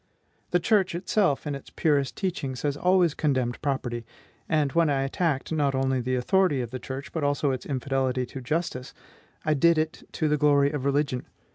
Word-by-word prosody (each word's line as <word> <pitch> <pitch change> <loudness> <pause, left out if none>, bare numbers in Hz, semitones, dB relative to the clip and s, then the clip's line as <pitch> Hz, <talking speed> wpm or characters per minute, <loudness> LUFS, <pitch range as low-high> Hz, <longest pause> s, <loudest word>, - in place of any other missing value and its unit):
The 175 - +2
church 190 -2 +2
itself, 180 -4 +1
in 145 - -2
its 140 - -8
purest 145 -4 +1
teachings, 155 -9 -3
has 145 -1 0
always 180 0 +3
condemned 130 -6 0
property; 125 -4 -2 0.5
and 150 -3 +2
when 165 0 +3
I 135 -1 +1
attacked, 145 +1 -1
not 145 -4 +1
only 130 -1 +1
the 130 +1 -1
authority 150 +4 +2
of 120 -2 -5
the 130 - -4
church, 135 +3 -7
but 160 - -3
also 145 0 +1
its 130 - -4
infidelity 130 -2 -1
to 130 +2 -8
justice, 130 -2 -3 0.5
I 155 - +3
did 170 +3 +4
it 155 0 -1
to 155 - 0
the 150 0 +2
glory 145 -1 +4
of 145 -3 -3
religion. 140 -2 0
145 Hz, 185 wpm, -26 LUFS, 130-160 Hz, 0.5 s, did